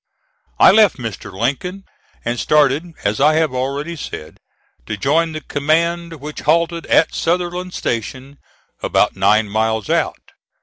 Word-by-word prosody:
I - - +8
left 210 -2 +5
Mr. 110 -5 -6
Lincoln 140 - -3 0.4
and 120 0 -1
started, 150 +3 +2
as 105 +1 0
I 155 +2 +5
have 160 -4 +1
already 140 +6 -3
said, 80 - -8 0.5
to 110 - -3
join 160 +7 +1
the 155 - -5
command, 165 +4 0
which 150 +2 -7
halted 170 +1 +1
at 160 - +3
Sutherland 180 +1 -2
Station, 130 +4 -4 0.4
about - - +1
nine 110 0 +3
miles 110 0 -1
out. - - -1
150 Hz, 135 wpm, -18 LUFS, 120-170 Hz, 0.5 s, I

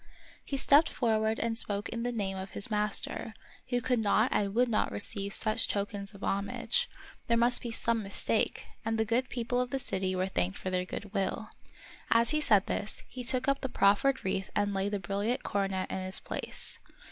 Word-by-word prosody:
He 275 - -3
stepped 290 +3 +5
forward 220 -3 +1
and 230 -1 -1
spoke 205 -2 -2
in 230 - -4
the 245 +1 -1
name 200 -5 -2
of 190 0 -6
his 205 - -4
master, 210 +1 0 0.3
who 245 0 +1
could 250 0 +1
not 220 +3 +3
and 200 0 0
would 250 +1 +4
not 220 -3 +1
receive 200 -1 -1
such 215 +2 +4
tokens 200 0 -2
of 200 - -11
homage; 200 - 0 0.4
there 235 - +3
must 240 +1 +5
be 240 - -4
some 230 0 0
mistake; 195 -1 0 0.2
and 225 0 -1
the 220 - +1
good 240 +4 0
people 245 0 -1
of 250 - -2
the 270 - -1
city 190 -7 -2
were 185 0 +1
thanked 95 - -1
for 185 - -4
their 180 0 0
good 200 +2 -7
will. 200 +2 -1 0.6
As 230 +2 +4
he 305 0 +1
said 205 -9 +5
this, 210 - -3
he 255 - -6
took 250 +2 +1
up 275 0 +2
the 265 - -2
proffered 245 +5 +3
wreath 190 0 -1
and 205 -1 +1
laid 195 +1 -1
the 205 - 0
brilliant 200 +6 -1
coronet 195 -2 -1
in - - -2
its 185 0 -2
place. - - -5
215 Hz, 205 wpm, -30 LUFS, 200-240 Hz, 0.6 s, stepped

